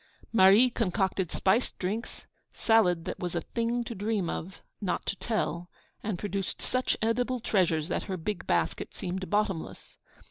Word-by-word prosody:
Marie 215 Hz, +4 st, +7 dB
concocted 190 Hz, -4 st, 0 dB
spiced 215 Hz, +6 st, +1 dB
drinks, 210 Hz, +6 st, -4 dB, 0.3 s
salad 180 Hz, -7 st, +3 dB
that -, -, -4 dB
was 175 Hz, -1 st, -3 dB
a 170 Hz, -, 0 dB
thing 235 Hz, +5 st, -1 dB
to 235 Hz, -, -5 dB
dream 205 Hz, -3 st, -1 dB
of, 185 Hz, +4 st, -6 dB, 0.2 s
not 185 Hz, -4 st, -1 dB
to -, -, -1 dB
tell, 180 Hz, -6 st, -2 dB, 0.3 s
and 210 Hz, -4 st, -2 dB
produced 195 Hz, -1 st, -3 dB
such 255 Hz, 0 st, 0 dB
edible 245 Hz, +3 st, +1 dB
treasures 170 Hz, -8 st, +1 dB
that 175 Hz, -, -2 dB
her 190 Hz, -2 st, -3 dB
big 185 Hz, +3 st, -4 dB
basket 85 Hz, -2 st, 0 dB
seemed 185 Hz, +1 st, -4 dB
bottomless. 205 Hz, -5 st, -2 dB
195 Hz, 150 wpm, -29 LUFS, 180-225 Hz, 0.3 s, Marie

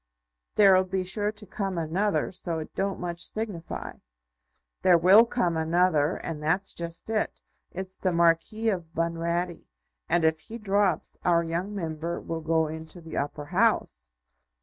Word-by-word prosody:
There'll 190 Hz, -2 st, +6 dB
be 185 Hz, 0 st, -2 dB
sure 205 Hz, +3 st, -1 dB
to 210 Hz, 0 st, -9 dB
come 195 Hz, -1 st, -3 dB
another, 180 Hz, +6 st, 0 dB
so 175 Hz, -2 st, -3 dB
it 155 Hz, -, -6 dB
don't 195 Hz, 0 st, -2 dB
much 175 Hz, -1 st, -4 dB
signify." 210 Hz, -7 st, -4 dB, 0.8 s
"There 180 Hz, -2 st, +6 dB
will 195 Hz, +7 st, +7 dB
come 180 Hz, -9 st, 0 dB
another, 160 Hz, -1 st, +2 dB
and 160 Hz, -3 st, -5 dB
that's 175 Hz, +6 st, +1 dB
just 170 Hz, 0 st, -4 dB
it. 215 Hz, -1 st, -1 dB, 0.3 s
It's 190 Hz, 0 st, -3 dB
the 185 Hz, -, +1 dB
Marquis 170 Hz, +6 st, +2 dB
of 170 Hz, -5 st, -4 dB
Bunratty; 170 Hz, +1 st, -2 dB, 0.4 s
and 170 Hz, -2 st, +3 dB
if 160 Hz, 0 st, +2 dB
he 220 Hz, +9 st, -8 dB
drops, 200 Hz, -5 st, 0 dB
our 170 Hz, -1 st, +3 dB
young 175 Hz, +5 st, -3 dB
Member 165 Hz, -2 st, -3 dB
will 165 Hz, 0 st, -5 dB
go 160 Hz, 0 st, +2 dB
into 160 Hz, +2 st, -8 dB
the 165 Hz, -1 st, -9 dB
Upper 145 Hz, +1 st, -3 dB
House." 175 Hz, -, +1 dB
175 Hz, 150 wpm, -27 LUFS, 165-195 Hz, 0.8 s, will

